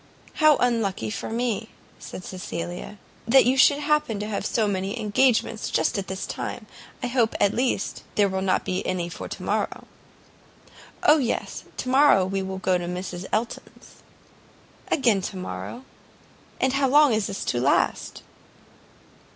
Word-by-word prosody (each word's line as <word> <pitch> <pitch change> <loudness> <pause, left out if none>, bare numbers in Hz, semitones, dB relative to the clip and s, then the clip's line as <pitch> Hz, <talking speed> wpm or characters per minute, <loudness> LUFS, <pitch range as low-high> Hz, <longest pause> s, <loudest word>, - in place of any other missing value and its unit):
"How 305 -2 +7
unlucky 215 - 0
for - - -5
me," 225 -1 -2 0.3
said 185 - -8
Cecilia, 180 +2 -6 0.3
"that 265 +3 +6
you 255 +2 +3
should 280 +2 +6
happen 295 -7 0
to 205 - -3
have 210 -1 -2
so 220 -3 +1
many 195 +3 -2
engagements 225 +1 +1
just - - +1
at 190 - -5
this 190 0 -4
time! - - -5 0.4
I - - +1
hope, 245 -2 +1
at 200 - +3
least, 245 -5 -1
there 205 -1 +4
will 190 0 -2
not 190 -1 +1
be 185 - -2
any 175 -2 -2
for - - -7
to - - -7
morrow." - - -2 1.2
"O 300 +1 +6
yes; 245 -4 -3
to 255 - -3
morrow 265 -8 +5
we 195 +1 -2
go 190 -1 -1
to 175 - -4
Mrs 180 +1 -5
Elton's." 230 +2 -4 0.9
"Again 230 -9 +2
to 190 - -5
morrow? 180 - -6 0.7
and 260 0 +1
how 275 0 +2
long 290 -1 +5
is 215 -2 0
this 195 - -5
to 120 - 0
last?" 135 - 0
210 Hz, 155 wpm, -25 LUFS, 190-255 Hz, 1.2 s, How